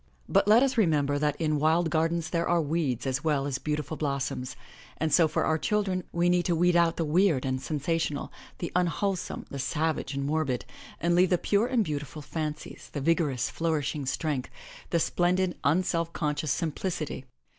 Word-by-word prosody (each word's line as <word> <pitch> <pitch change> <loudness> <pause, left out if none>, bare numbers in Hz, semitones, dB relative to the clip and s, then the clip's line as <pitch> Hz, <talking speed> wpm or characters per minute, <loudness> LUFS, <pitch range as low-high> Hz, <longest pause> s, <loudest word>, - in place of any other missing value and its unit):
But 195 +1 +3
let 220 +5 +7
us 265 -3 +1
remember 145 -7 +2
that 150 -1 +1
in 155 -2 +1
wild 160 +2 +2
gardens 165 +1 0
there 170 -1 0
are 175 0 +3
weeds 150 -6 -1
as 135 +1 -1
well 150 -4 +1
as 135 -2 -2
beautiful 150 +1 -3
blossoms, 135 -3 -2 0.4
and 160 -1 -1
so 165 -3 +6
for - - 0
our 160 0 +1
children, 195 -3 0
we 170 +1 +1
need 175 0 +2
to 175 - +2
weed 175 +1 +3
out 170 -1 +4
the 165 - 0
weird 160 -3 +2
and 130 0 -1
sensational, 150 +1 -2 0.3
the 170 - -4
unwholesome, 180 +1 -1
the 140 - -5
savage 150 0 -1
and 140 0 -2
morbid, 145 -4 -1 0.3
and 170 +2 +1
leave 180 +1 +4
the 180 - +3
pure 205 +6 +1
and 250 -3 +2
beautiful 150 -2 -5
fancies, 150 +1 -5
the 145 - -2
vigorous, 145 -4 +1
flourishing 150 -3 -1
strength, 140 -1 -2 0.4
the 170 - +2
splendid, 180 +2 +1
unself 165 +2 +1
conscious 150 -2 -1
simplicity. 155 -2 -3
160 Hz, 175 wpm, -28 LUFS, 145-175 Hz, 0.4 s, let